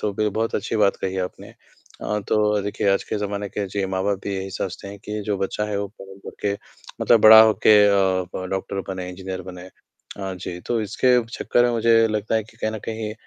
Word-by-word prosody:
तो 105 Hz, -, -1 dB
भी 105 Hz, +2 st, 0 dB
बहुत 110 Hz, +2 st, -2 dB
अच्छी -, -, -2 dB
बात 105 Hz, -2 st, +3 dB
कही 95 Hz, 0 st, -2 dB
आपने। 90 Hz, 0 st, -5 dB
अ, 105 Hz, -, -7 dB
तो 105 Hz, -1 st, +2 dB
देखिए, 100 Hz, 0 st, -1 dB
आज 100 Hz, -, 0 dB
के -, -, -3 dB
ज़माने 100 Hz, 0 st, -3 dB
के, 100 Hz, 0 st, -4 dB
जी, 100 Hz, +1 st, -2 dB
माँ-बाप 95 Hz, +1 st, -1 dB
भी 100 Hz, -1 st, -3 dB
यही 95 Hz, 0 st, -5 dB
सोचते 95 Hz, 0 st, -5 dB
हैं 100 Hz, +1 st, -9 dB
कि 105 Hz, 0 st, -4 dB
जो 105 Hz, -1 st, 0 dB
बच्चा 95 Hz, +2 st, -2 dB
है, 105 Hz, -, -1 dB
वो 100 Hz, -, -2 dB
पढ़ाई 95 Hz, -2 st, -14 dB
करके 100 Hz, -1 st, -3 dB, 0.5 s
मतलब 115 Hz, -, +4 dB
बड़ा 110 Hz, +1 st, +10 dB
होके 110 Hz, -1 st, +5 dB
अ, 95 Hz, -2 st, +2 dB
प 95 Hz, -, -4 dB
डॉक्टर 95 Hz, 0 st, -3 dB
बने, 95 Hz, -1 st, -5 dB
इंजीनियर 95 Hz, 0 st, -6 dB
बने 90 Hz, 0 st, -10 dB, 0.5 s
अ, 95 Hz, -1 st, -5 dB
जी। 90 Hz, -1 st, -7 dB
तो 120 Hz, -2 st, 0 dB
इसके 125 Hz, +4 st, +2 dB
चक्कर 120 Hz, +1 st, +1 dB
में 120 Hz, -, +2 dB
मुझे 115 Hz, -1 st, +4 dB
लगता 105 Hz, 0 st, -2 dB
है 110 Hz, -, +2 dB
कि -, -, -20 dB
कहीं 110 Hz, -, -2 dB
न 110 Hz, -, -5 dB
कहीं 110 Hz, -1 st, -4 dB
100 Hz, 220 wpm, -22 LUFS, 95-110 Hz, 0.5 s, बड़ा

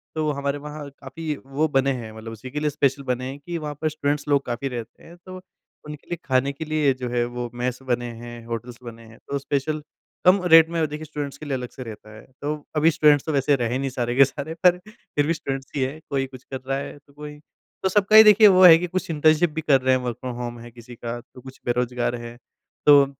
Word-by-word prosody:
तो 155 Hz, -1 st, 0 dB
हमारे 140 Hz, 0 st, -2 dB
वहाँ 150 Hz, 0 st, -8 dB
काफ़ी 150 Hz, +3 st, -5 dB
वो 145 Hz, +4 st, 0 dB
बने 135 Hz, -1 st, +2 dB
हैं 110 Hz, -1 st, -8 dB
मतलब 110 Hz, +1 st, -9 dB
उसी 115 Hz, +4 st, -9 dB
के 150 Hz, -, -3 dB
लिए 150 Hz, 0 st, 0 dB
स्पेशल 140 Hz, 0 st, 0 dB
बने 125 Hz, -1 st, -2 dB
हैं 140 Hz, +2 st, -8 dB
कि 170 Hz, +3 st, -5 dB
वहाँ 150 Hz, -2 st, -5 dB
पर 155 Hz, -, +1 dB
स्टूडेंट्स 145 Hz, -1 st, -2 dB
लोग 140 Hz, -1 st, +2 dB
काफ़ी 120 Hz, +3 st, -3 dB
रहते 120 Hz, -2 st, -8 dB
हैं 170 Hz, -, -14 dB
तो 185 Hz, 0 st, -9 dB, 0.5 s
उनके 150 Hz, -1 st, -10 dB
लिए 175 Hz, -, -3 dB
ख़ाने 130 Hz, +1 st, +1 dB
के 160 Hz, +3 st, -6 dB
लिए 150 Hz, -3 st, +2 dB
जो 125 Hz, -1 st, -3 dB
है 120 Hz, 0 st, 0 dB
वो 120 Hz, 0 st, -5 dB
मेस 125 Hz, +1 st, -3 dB
बने 120 Hz, -1 st, -1 dB
हैं, 120 Hz, 0 st, -10 dB
होटल्स 115 Hz, +1 st, -6 dB
बने 115 Hz, -1 st, -10 dB
हैं 110 Hz, -, -16 dB
तो 140 Hz, -, -1 dB
स्पेशल 150 Hz, +3 st, -2 dB, 0.4 s
कम 185 Hz, +1 st, +6 dB
रेट 165 Hz, 0 st, +9 dB
में 165 Hz, -2 st, 0 dB
देखिए 150 Hz, +1 st, -6 dB
स्टूडेंट्स 145 Hz, -2 st, -6 dB
के 155 Hz, -, -10 dB
लिए 140 Hz, -, -3 dB
अलग 125 Hz, -1 st, -6 dB
से 130 Hz, -, -9 dB
रहता 110 Hz, -1 st, -10 dB
है। 110 Hz, -, -12 dB, 0.2 s
तो 150 Hz, +1 st, -1 dB, 0.2 s
अभी 160 Hz, +2 st, +4 dB
स्टूडेंट्स 150 Hz, -2 st, +4 dB
तो 160 Hz, -, -1 dB
वैसे 140 Hz, 0 st, +2 dB
रहे 120 Hz, 0 st, -1 dB
नहीं 135 Hz, 0 st, -2 dB
सारे 120 Hz, -1 st, -2 dB
के 135 Hz, 0 st, +7 dB
सारे 145 Hz, +4 st, -6 dB
पर 180 Hz, 0 st, +6 dB
फ़िर 180 Hz, -8 st, -4 dB
भी 165 Hz, -, +2 dB
स्टूडेंट्स 135 Hz, -3 st, -5 dB
ही 140 Hz, -, 0 dB
है 135 Hz, +4 st, -2 dB
कोई 135 Hz, -1 st, 0 dB
कुछ 130 Hz, -1 st, -13 dB
कर 130 Hz, -1 st, -7 dB
रहा 135 Hz, 0 st, 0 dB
है 140 Hz, -, -6 dB
तो 140 Hz, 0 st, -26 dB
कोई 150 Hz, 0 st, -9 dB, 0.5 s
तो 190 Hz, -, +2 dB
सबका 205 Hz, +2 st, +3 dB
ही 220 Hz, -, +12 dB
देखिए 210 Hz, 0 st, +8 dB
वो 185 Hz, -, +6 dB
है 165 Hz, -2 st, +10 dB
कि 180 Hz, +1 st, -3 dB
कुछ 185 Hz, 0 st, -3 dB
इंटर्नशिप 155 Hz, +2 st, +3 dB
भी 160 Hz, -, -3 dB
कर 140 Hz, -4 st, +3 dB
रहे 130 Hz, 0 st, +3 dB
हैं 130 Hz, -, -1 dB
वर्क 120 Hz, -2 st, -3 dB
फ्रॉम 125 Hz, -2 st, -5 dB
होम 120 Hz, -1 st, -5 dB
है 120 Hz, 0 st, -11 dB
किसी 120 Hz, +1 st, -13 dB
का 120 Hz, +1 st, -5 dB
तो 125 Hz, 0 st, -17 dB
कुछ 130 Hz, 0 st, -12 dB
बेरोज़गार 120 Hz, 0 st, -1 dB
हैं। 120 Hz, 0 st, -9 dB, 0.5 s
तो 145 Hz, -1 st, +8 dB
140 Hz, 250 wpm, -23 LUFS, 125-155 Hz, 0.5 s, ही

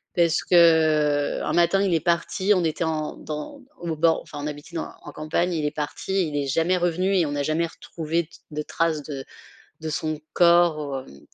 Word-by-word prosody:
parce 170 Hz, -1 st, +3 dB
que, 180 Hz, -, +4 dB
heu, 155 Hz, -4 st, +4 dB
un 150 Hz, -, -1 dB
matin 175 Hz, +3 st, +3 dB
il 190 Hz, -3 st, +1 dB
est 165 Hz, -, +3 dB
parti, 180 Hz, +3 st, +1 dB
on 180 Hz, -, +1 dB
était 160 Hz, +1 st, -1 dB
en 155 Hz, -1 st, -2 dB
dans 155 Hz, -, -7 dB, 0.2 s
au 170 Hz, -2 st, -4 dB
bord 165 Hz, +1 st, +3 dB
enfin 145 Hz, -, -9 dB
on -, -, -2 dB
habitait 150 Hz, +3 st, -8 dB
dans -, -, -4 dB
en -, -, -9 dB
campagne 160 Hz, +4 st, -1 dB
et -, -, -1 dB
il 150 Hz, -, -1 dB
est 150 Hz, -, 0 dB
parti 190 Hz, -, -7 dB
et 195 Hz, -, +3 dB
il 150 Hz, -3 st, -3 dB
est 140 Hz, -, -3 dB
jamais 165 Hz, +6 st, +2 dB
revenu 180 Hz, +2 st, +1 dB
et 175 Hz, -, +3 dB
on 145 Hz, -, -3 dB
n'a 145 Hz, 0 st, -1 dB
jamais 155 Hz, +3 st, 0 dB
retrouvé 165 Hz, +1 st, -3 dB
d 155 Hz, -, -21 dB, 0.2 s
de 150 Hz, 0 st, -3 dB
trace 160 Hz, -1 st, -1 dB
de 140 Hz, -2 st, -6 dB, 0.6 s
de 160 Hz, 0 st, -4 dB
son 155 Hz, 0 st, -2 dB, 0.2 s
corps, 160 Hz, -6 st, +3 dB
hem, 70 Hz, -, -15 dB
160 Hz, 220 wpm, -24 LUFS, 150-170 Hz, 0.6 s, que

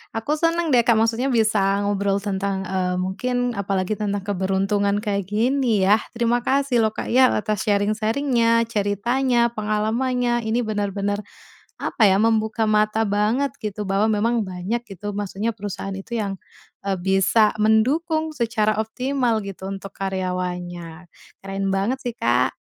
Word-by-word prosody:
aku 290 Hz, +8 st, -1 dB
seneng 330 Hz, -1 st, +1 dB
deh 245 Hz, -, +5 dB
Kak, 235 Hz, -, +5 dB
maksudnya 225 Hz, +3 st, +1 dB
bisa 210 Hz, -5 st, +2 dB
ngobrol 200 Hz, -1 st, 0 dB
tentang, 195 Hz, -1 st, -2 dB
eee, 185 Hz, -1 st, -1 dB
mungkin 245 Hz, +7 st, -1 dB
apalagi 200 Hz, -2 st, -2 dB
tentang 205 Hz, -2 st, -2 dB
keberuntungan 200 Hz, +1 st, 0 dB
kayak 200 Hz, -3 st, -2 dB
gini 230 Hz, 0 st, +1 dB
ya. 210 Hz, +3 st, +5 dB, 0.2 s
Terima 235 Hz, +1 st, +2 dB
kasih 265 Hz, 0 st, +1 dB
loh 220 Hz, -1 st, +1 dB
Kak -, -, -4 dB
ya 255 Hz, +1 st, +6 dB
atas 215 Hz, -1 st, -2 dB
sharing-sharing-nya, 230 Hz, +3 st, +2 dB
ceritanya, 235 Hz, +4 st, +1 dB
pengalamannya. 235 Hz, +2 st, 0 dB
Ini 235 Hz, +2 st, +1 dB
benar-benar 205 Hz, -1 st, -2 dB, 0.6 s
apa 220 Hz, -4 st, +2 dB
ya, 190 Hz, -, +4 dB
membuka 220 Hz, +1 st, +1 dB
mata 215 Hz, 0 st, +2 dB
banget 220 Hz, +7 st, +1 dB
gitu, 210 Hz, -1 st, -4 dB
bahwa 200 Hz, +2 st, +1 dB
memang 220 Hz, 0 st, +1 dB
banyak 185 Hz, +6 st, -3 dB, 0.2 s
gitu 205 Hz, +3 st, -5 dB
maksudnya 205 Hz, +2 st, -2 dB
perusahaan 205 Hz, -2 st, -6 dB
itu 195 Hz, +5 st, -6 dB
yang, 195 Hz, -2 st, -4 dB, 0.5 s
eee, 195 Hz, -, +1 dB
bisa 195 Hz, +4 st, +3 dB
mendukung 310 Hz, +9 st, +2 dB
secara 220 Hz, -5 st, 0 dB
optimal 245 Hz, -1 st, -1 dB
gitu 195 Hz, -1 st, -7 dB
untuk 195 Hz, 0 st, -6 dB
karyawannya. 180 Hz, -3 st, -4 dB, 0.4 s
Keren 195 Hz, 0 st, -3 dB
banget 225 Hz, +8 st, 0 dB
sih, 245 Hz, -3 st, -5 dB
Kak. 125 Hz, -, +1 dB
215 Hz, 140 wpm, -22 LUFS, 195-235 Hz, 0.6 s, ya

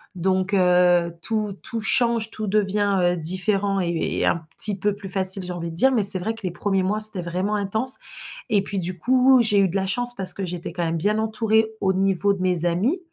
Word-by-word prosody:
donc 185 Hz, +2 st, -1 dB
heu, 180 Hz, -2 st, +2 dB
tout 215 Hz, -1 st, -3 dB
tout 230 Hz, -, -5 dB
change. 230 Hz, -1 st, 0 dB
Tout 215 Hz, -1 st, -6 dB
devient, 205 Hz, 0 st, 0 dB
heu, 175 Hz, 0 st, 0 dB
différent 195 Hz, +4 st, -1 dB
et 170 Hz, -2 st, -2 dB
heu, -, -, -3 dB
et -, -, -2 dB
un -, -, +1 dB, 0.2 s
petit 210 Hz, -2 st, +2 dB
peu 205 Hz, +1 st, -2 dB
plus 200 Hz, -2 st, -9 dB
facile, 190 Hz, 0 st, +3 dB
j'ai 180 Hz, 0 st, -6 dB
envie 170 Hz, -1 st, -6 dB
de 165 Hz, -, -10 dB
dire, 265 Hz, +9 st, +2 dB
mais 235 Hz, -5 st, +1 dB
c'est 195 Hz, -1 st, +8 dB
vrai 215 Hz, +5 st, -4 dB
que 225 Hz, -, -14 dB
les 185 Hz, -, -2 dB
1ers 195 Hz, +2 st, -2 dB
mois, 205 Hz, +3 st, -2 dB
c'était 215 Hz, -4 st, +3 dB
vraiment 180 Hz, +5 st, -4 dB
intense 220 Hz, +6 st, +4 dB, 0.6 s
et 205 Hz, -2 st, +1 dB
puis 200 Hz, 0 st, -5 dB
du 180 Hz, +1 st, -4 dB
coup, 255 Hz, +4 st, +3 dB
j'ai 210 Hz, -2 st, +2 dB
eu 195 Hz, -, +3 dB
de 185 Hz, -, -8 dB
la 190 Hz, 0 st, -1 dB
chance 245 Hz, +5 st, +2 dB
parce 185 Hz, -2 st, +3 dB
que 195 Hz, -, -6 dB
j'étais 175 Hz, -1 st, -6 dB
quand 175 Hz, -1 st, -4 dB
même 165 Hz, 0 st, -2 dB
bien 210 Hz, +6 st, -1 dB
entourée, 220 Hz, 0 st, 0 dB
au 190 Hz, -1 st, 0 dB
niveau 195 Hz, +1 st, 0 dB
de 190 Hz, -, -7 dB
mes 180 Hz, -2 st, 0 dB
amis, 210 Hz, -, -1 dB
195 Hz, 240 wpm, -21 LUFS, 180-215 Hz, 0.6 s, c'est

